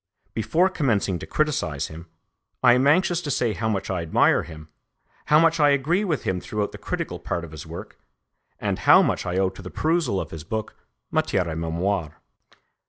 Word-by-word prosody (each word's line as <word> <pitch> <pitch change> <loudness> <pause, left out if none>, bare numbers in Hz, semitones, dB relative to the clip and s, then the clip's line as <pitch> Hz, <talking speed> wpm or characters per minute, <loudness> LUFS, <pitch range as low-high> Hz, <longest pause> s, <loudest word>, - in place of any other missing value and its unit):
Before 115 - +2
commencing 115 - 0
to - - -8
criticise 140 - -1
him, 80 +2 -10 0.6
I 125 -1 +7
am 130 +3 +3
anxious 175 +3 +3
to 150 - -5
say 120 -4 +1
how 110 +1 -2
much 100 -2 -2
I 90 -2 -1
admire 80 -1 +3
him, 80 -2 -11 0.6
how 150 - +5
much 165 0 +3
I 145 -1 +5
agree 145 +8 +2
with 160 - -1
him 90 -1 -1
throughout 105 -1 -3
the - - -10
critical - - -4
part 85 - -3
of 85 - -9
his 80 -2 -9
work, - - -9 0.6
and - - -2
how - - +7
much - - -1
I 90 +1 -1
owe 95 -1 +2
to - - -12
the 90 - -8
perusal 160 - 0
of - - -5
his 80 -2 -7
book, 110 +5 -4 0.4
Matière 90 - +1
et 80 -2 -4
Mémoire. 85 0 -2
105 Hz, 195 wpm, -24 LUFS, -, 0.6 s, I